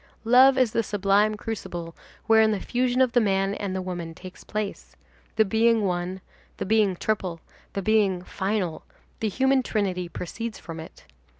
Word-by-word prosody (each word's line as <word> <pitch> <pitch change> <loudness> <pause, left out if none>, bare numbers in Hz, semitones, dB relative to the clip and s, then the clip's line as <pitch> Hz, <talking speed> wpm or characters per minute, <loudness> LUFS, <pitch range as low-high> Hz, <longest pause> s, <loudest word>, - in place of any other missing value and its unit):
Love 260 +3 +6
is 255 -4 +3
the 230 - +1
sublime 205 0 +2
crucible 175 -6 -6 0.3
wherein 220 -1 +5
the 210 - -1
fusion 250 +3 0
of 255 -2 +4
the 245 - +4
man 195 -1 +1
and 200 -2 -4
the 190 - -2
woman 175 -3 -5
takes 185 +1 -11
place; 210 -2 -5 0.4
the 220 0 +4
being 225 +2 +3
one, 180 +1 -2 0.4
the - - -3
being 210 -2 +3
triple, 185 -4 -2 0.3
the 195 - -3
being 200 -4 +2
final, 190 -3 -2 0.4
the 220 - 0
human 265 +5 +2
trinity 190 -7 -2
proceeds 225 +7 -5
from 165 -1 -8
it. 160 - -11
205 Hz, 165 wpm, -25 LUFS, 185-225 Hz, 0.4 s, Love